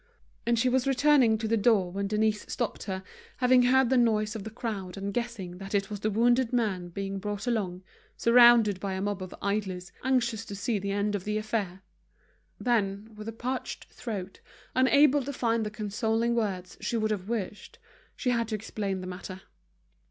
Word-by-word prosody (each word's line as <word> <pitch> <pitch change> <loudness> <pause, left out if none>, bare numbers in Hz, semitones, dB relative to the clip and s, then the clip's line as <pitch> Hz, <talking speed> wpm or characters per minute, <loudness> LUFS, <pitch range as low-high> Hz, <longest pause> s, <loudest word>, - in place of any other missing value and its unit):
And 235 0 +3
she 230 - +2
was 255 +1 +2
returning 270 -4 +4
to 220 0 -3
the 225 - +2
door 205 -4 +3
when 200 +2 -2
Denise 215 0 +1
stopped 240 - -3
her, 190 -1 -4 0.3
having 250 0 +5
heard 255 0 +4
the 260 - +4
noise 215 -2 +2
of 215 - -5
the 220 - -6
crowd 210 -5 -5
and 200 +1 -4
guessing 210 -7 -4
that 195 +1 -4
it 195 0 0
was 205 - -4
the 215 - 0
wounded 240 +3 +3
man 205 -8 0
being 195 +2 -4
brought 205 +2 -4
along, 195 -7 -1 0.3
surrounded 235 -4 +6
by 195 0 -3
a 190 - -3
mob 205 -1 -2
of 185 - -7
idlers 195 -3 -2
anxious 240 -4 +1
to 200 - -7
see 205 +2 -1
the 200 +1 -4
end 205 +1 0
of 200 -3 -2
the 210 +1 -1
affair. 210 -4 -3 0.8
Then, 215 -3 0
with 215 0 -9
a - - -2
parched 250 +3 -4
throat, 200 -5 -6 0.3
unable 280 +2 +5
to 275 +2 -4
find 230 -4 0
the 210 - -2
consoling 220 +2 -1
words 195 -6 -2
she 235 - -1
would 215 -1 0
have 200 -1 -3
wished, 210 -3 -4 0.4
she 250 - 0
had 230 -2 0
to 220 - -2
explain 200 -3 -3
the - - -6
matter. 185 +1 -7
215 Hz, 190 wpm, -28 LUFS, 195-235 Hz, 0.8 s, surrounded